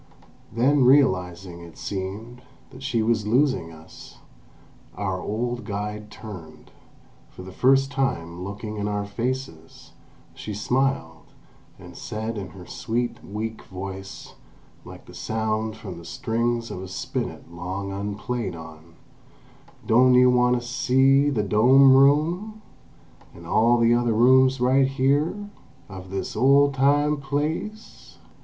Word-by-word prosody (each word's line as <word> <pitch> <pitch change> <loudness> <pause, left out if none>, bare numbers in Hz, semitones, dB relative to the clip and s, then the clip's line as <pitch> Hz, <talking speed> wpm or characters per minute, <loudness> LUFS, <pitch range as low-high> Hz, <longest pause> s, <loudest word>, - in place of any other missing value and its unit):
Then 130 +5 +3
realising, 95 -10 +2
it 85 -1 -13
seemed, 105 +5 -6 0.3
that 130 - -13
she 125 -4 -1
was 110 -2 0
losing 120 - +1
us, 80 0 -14 0.8
our 95 -1 -3
old 120 +4 -3
guide 105 +1 -5
turned; 95 -9 -11 0.6
for 90 - -12
the 95 - -10
first 135 +6 +3
time 90 -11 -2
looking 105 +2 -6
in 105 0 -2
our 105 -1 -2
faces, 115 -6 -5 0.4
she 105 - -7
smiled, 115 - -1 0.5
and - - -13
said 110 +1 -5
in 100 -3 -5
her 90 +1 -12
sweet, 120 +4 -3
weak 110 +2 -5
voice, 95 +1 -8 0.5
like - - -12
the - - -14
sound 110 +4 -2
from 95 -6 -8
the 85 - -13
strings 120 0 -2
of 90 - -6
a 95 - -7
spinet 90 -2 -5
long 95 +3 -5
unplayed 100 +1 -4
on: 80 0 -12 0.9
"Don' 125 +2 +5
you 125 0 +6
wahnd 125 0 +3
to 120 - -2
see 135 +3 +3
the 115 -7 0
dome 130 +7 +6
room: 165 +11 +2 0.7
an' 85 - -12
all 115 +7 +3
the 115 0 +4
other 120 -1 +1
rooms 130 +3 +4
right 130 +2 +3
here, 140 +5 +1 0.5
of 95 -2 -10
this 95 0 -4
old 140 +4 +4
time 145 +3 +2
place?" 150 +10 -5
115 Hz, 130 wpm, -24 LUFS, 95-130 Hz, 0.9 s, you